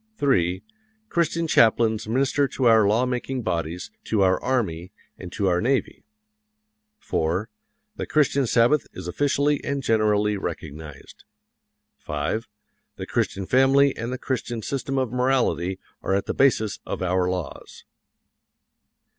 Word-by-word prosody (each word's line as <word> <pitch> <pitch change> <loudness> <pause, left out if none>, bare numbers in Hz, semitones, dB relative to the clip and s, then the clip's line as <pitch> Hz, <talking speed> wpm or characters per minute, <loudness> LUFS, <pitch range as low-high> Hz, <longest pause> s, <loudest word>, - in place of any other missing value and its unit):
3. 95 - +1 0.5
Christian 170 0 0
chaplains 110 -6 +3
minister 135 +4 +1
to 130 - -3
our 110 -3 +6
law 110 +5 +2
making 125 0 -3
bodies, 85 -2 -3
to 105 -3 +1
our 95 0 +2
army, 100 -9 -1 0.2
and 90 -2 -10
to 100 - -2
our 90 -2 +2
navy. 130 +3 -1 0.9
4. 85 +8 -2 0.5
The - - -4
Christian 140 -3 +2
Sabbath 120 +5 +3
is 90 -1 -8
officially 145 +7 +1
and 140 -1 -2
generally 105 -2 +2
recognized. 80 -5 -8 0.8
5. 75 +10 -3 0.5
The - - -6
Christian 95 -1 -2
family 135 +4 +4
and 115 +2 -4
the 130 - -3
Christian 120 -3 -3
system 135 +2 -3
of 130 -4 0
morality 125 - +1 0.2
are 95 - 0
at 100 - -1
the - - -2
basis 110 -6 +2
of - - -4
our 90 0 +1
laws. 90 -3 -6
110 Hz, 130 wpm, -24 LUFS, 90-135 Hz, 0.9 s, our